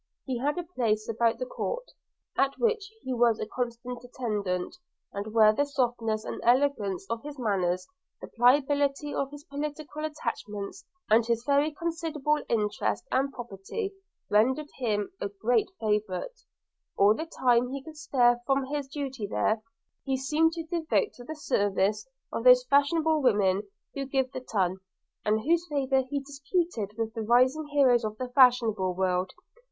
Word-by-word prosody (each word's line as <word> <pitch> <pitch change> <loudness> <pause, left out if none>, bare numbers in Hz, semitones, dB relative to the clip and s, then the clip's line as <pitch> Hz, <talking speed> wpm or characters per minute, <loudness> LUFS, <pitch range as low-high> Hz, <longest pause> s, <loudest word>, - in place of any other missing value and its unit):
He 255 -3 -2
had 290 +6 0
a 355 - -2
place 230 -11 -1
about 230 0 +1
the - - -3
court, - - -4 0.5
at 275 0 +2
which 450 -3 0
he 260 - -2
was 235 -2 +3
a - - -2
constant 240 +1 -5
attendant, 210 -8 -3 0.4
and 205 +2 -5
where 215 -1 +6
the 285 - +2
softness 240 -6 -1
and - - -5
elegance 240 -7 +2
of 230 +1 -3
his 295 0 -8
manners, 185 -6 0 0.3
the - - -7
pliability 285 +3 +2
of 275 - -1
his 290 0 -11
political 300 0 -5
attachments, 225 -9 -5 0.3
and 225 +2 +6
his 230 -1 0
very 285 +2 +3
considerable 310 -2 -1
interest 210 -3 0
and 270 +1 +1
property, 240 - -5 0.3
rendered 260 +8 +2
him 210 -5 -1
a 200 - -1
great 220 - +1
favourite. 215 - -2 0.2
– - - -53
All 200 +2 +6
the 320 +8 -5
time 245 -5 +2
he 270 +1 -5
could 315 +1 -11
spare 245 -5 +3
from 270 -1 +2
his 285 0 -3
duty 270 -6 -4
there, 215 +2 0 0.4
he 270 -1 0
seemed 305 +5 +2
to 330 -1 -4
devote 335 +6 0
to 245 - -12
the 315 +6 -6
service 205 -5 0 0.3
of 230 - -2
those 250 0 +8
fashionable 300 +4 +3
women 205 -5 +2 0.2
who 275 -1 -3
give 265 -1 0
the 255 - -5
ton, 190 -6 0 0.5
and 215 +1 +1
whose 340 +6 +1
favour 270 -3 +1
he 285 0 -1
disputed 280 - -2
with 225 -1 -2
the 225 - -4
rising 255 +7 +3
heroes 265 -5 +4
of 215 0 -3
the 255 +1 -4
fashionable 235 -8 +4
world. 185 0 0
255 Hz, 160 wpm, -28 LUFS, 215-290 Hz, 0.5 s, those